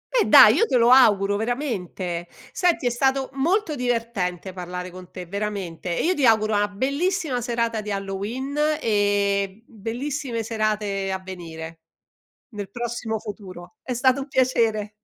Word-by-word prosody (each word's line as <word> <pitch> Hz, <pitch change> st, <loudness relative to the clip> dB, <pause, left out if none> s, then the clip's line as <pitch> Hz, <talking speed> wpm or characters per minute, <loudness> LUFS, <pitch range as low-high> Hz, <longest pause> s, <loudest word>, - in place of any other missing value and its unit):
Eh 465 Hz, -, +4 dB
dai, -, -, +9 dB
io 460 Hz, -, +3 dB
te 255 Hz, -, +2 dB
lo 235 Hz, +1 st, +5 dB
auguro 205 Hz, -6 st, +5 dB
veramente. 195 Hz, -, -3 dB, 0.2 s
Senti 350 Hz, -7 st, +1 dB
è -, -, +4 dB
stato 265 Hz, +2 st, 0 dB
molto 330 Hz, +6 st, +1 dB
divertente 230 Hz, -, -2 dB
parlare 180 Hz, 0 st, -6 dB
con 180 Hz, 0 st, -11 dB
te 180 Hz, -, -8 dB
veramente 185 Hz, -3 st, -4 dB
e -, -, 0 dB
io 360 Hz, -, +3 dB
ti 290 Hz, -, -2 dB
auguro 220 Hz, -1 st, +3 dB
una 205 Hz, 0 st, +2 dB
bellissima 280 Hz, -, -1 dB
serata 230 Hz, -2 st, -1 dB
di 210 Hz, -, -6 dB
Halloween 200 Hz, +8 st, -4 dB, 0.2 s
e 205 Hz, -1 st, 0 dB
bellissime 235 Hz, +2 st, -4 dB
serate 210 Hz, -3 st, -1 dB
a 190 Hz, -, -1 dB
venire 165 Hz, -3 st, -8 dB, 0.7 s
nel 205 Hz, -4 st, -7 dB
prossimo 235 Hz, 0 st, -3 dB
futuro. 195 Hz, +2 st, -10 dB
È 255 Hz, -, -4 dB
stato 260 Hz, +2 st, +2 dB
un 270 Hz, -, -6 dB
piacere. 230 Hz, -6 st, +1 dB
215 Hz, 150 wpm, -23 LUFS, 195-255 Hz, 0.7 s, dai